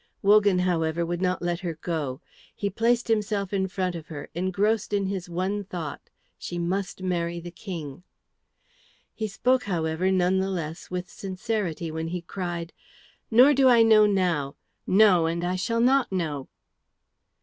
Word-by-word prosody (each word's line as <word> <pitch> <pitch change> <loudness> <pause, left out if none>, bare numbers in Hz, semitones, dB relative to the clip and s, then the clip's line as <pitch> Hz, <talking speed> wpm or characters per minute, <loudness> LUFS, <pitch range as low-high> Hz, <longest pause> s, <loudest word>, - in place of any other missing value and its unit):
Wogan, 205 -1 +5
however, 170 -2 0
would 175 +1 -3
not 185 -1 0
let 175 0 -1
her 175 -4 -4
go. 155 -4 -3 0.3
He 200 -1 -2
placed 235 +3 +1
himself 210 -3 0
in 190 -1 +1
front 185 -1 -2
of 165 -2 -8
her, 145 -2 -8
engrossed 200 +5 0
in 200 -1 +1
his 190 -2 -4
one 190 +4 -2
thought, 170 -6 -6 0.4
"She 175 - -5
must 185 +2 -2
marry 170 -2 -1
the 175 +1 -8
King." 165 -6 -7 1.1
He 220 - -3
spoke, 250 +5 +1
however, 170 -1 0
none 185 0 +2
the 190 +1 -1
less 165 -3 -5
with 180 0 -4
sincerity 185 -4 -3
when 160 +1 -3
he 175 +1 -4
cried, 175 -2 -5 0.6
"Nor 250 +6 +7
do 265 -1 +5
I 235 -2 +6
know 215 -1 +6
now 175 -8 0 0.3
no, 185 -4 +5
and 170 +1 -2
I 180 +1 0
shall 230 +5 -1
not 260 0 +3
know." 155 -7 -2
185 Hz, 160 wpm, -26 LUFS, 170-205 Hz, 1.1 s, Nor